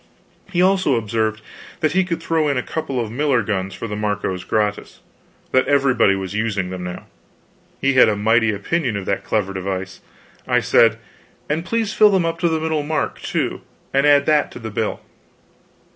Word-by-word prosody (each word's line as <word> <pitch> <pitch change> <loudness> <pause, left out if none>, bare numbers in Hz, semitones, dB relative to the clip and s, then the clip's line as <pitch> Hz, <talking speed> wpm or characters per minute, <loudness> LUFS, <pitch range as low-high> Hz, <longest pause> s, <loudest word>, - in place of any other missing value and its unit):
He 180 -1 +2
also 190 -7 +3
observed 110 -1 -1 0.4
that 155 - +2
he 190 +1 +3
would 165 -1 -3
throw 160 -2 +1
in 140 -2 0
a 125 - -1
couple 140 -5 -3
of 115 -3 -3
miller 130 -2 +1
guns 95 -2 -3
for 115 - -5
the 105 - -4
Marcos 105 -3 -2
gratis 105 0 -2 0.5
that 130 - +3
everybody 135 -8 +3
was 95 0 -5
using 105 -4 -1
them 90 -1 -5
now. 90 0 -7 0.7
He 135 0 +2
had 130 -3 +6
a 105 - +1
mighty 115 +2 +2
opinion 115 +3 -1
of 100 - -5
that 100 0 -1
clever 100 0 -1
device. 95 0 -4 0.5
I - - +3
said: - - +4 0.5
"And 155 +3 -1
please 225 +2 -1
fill 215 - +6
them 190 -4 +2
up 165 0 -2
to 170 0 +2
the 160 -1 0
middle 160 -1 -1
mark, 155 +2 -2
too; - - -2 0.3
and 135 +2 +3
add 145 -1 +5
that 150 -1 +2
to - - -9
the 110 -2 -6
bill." 110 +1 -2
115 Hz, 190 wpm, -20 LUFS, 105-155 Hz, 0.7 s, had